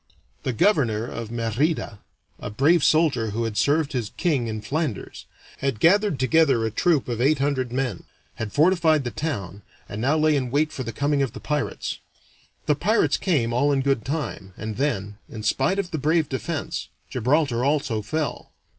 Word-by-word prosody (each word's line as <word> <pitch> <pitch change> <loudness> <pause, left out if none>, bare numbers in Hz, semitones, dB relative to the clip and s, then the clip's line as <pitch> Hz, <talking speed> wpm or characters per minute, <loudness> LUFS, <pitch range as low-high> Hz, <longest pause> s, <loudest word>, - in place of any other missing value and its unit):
The 130 - -1
governor 115 - +2
of 115 -2 -6
Merida, 115 +1 -1 0.4
a - - -5
brave 145 +9 +3
soldier 145 -8 +3
who 115 +3 -2
had 115 -2 -3
served 145 +8 +1
his 120 -5 -2
king 145 -10 +1
in 110 -1 -4
Flanders, 145 -2 -3 0.3
had 135 -5 -1
gathered 200 - +4
together 135 -3 +3
a 110 - -1
troop 155 - +1
of 120 -1 -2
eight 145 +4 +3
hundred 135 -3 -1
men, 125 -7 -2 0.3
had 110 -2 -4
fortified 160 - +3
the 120 - -3
town, 100 - -4 0.3
and 105 - -6
now 140 +6 +2
lay 155 0 +3
in 130 -3 -1
wait 150 +4 +1
for - - -6
the 115 - -4
coming 145 +3 0
of 135 -5 -1
the - - -8
pirates. 150 -1 -3 0.7
The 150 - +3
pirates 210 +10 +2
came 130 -11 0
all 140 +4 +2
in 135 -1 +2
good 135 -4 +1
time, 120 - -4
and 110 -1 -5
then, 105 -7 -2
in 110 -2 -8
spite 135 - +1
of 190 -3 -2
the 160 - -2
brave 155 +2 +2
defense, 130 -5 -3 0.2
Gibraltar 130 -1 +1
also 140 -6 0
fell. 150 +8 -4
135 Hz, 180 wpm, -24 LUFS, 115-155 Hz, 0.7 s, gathered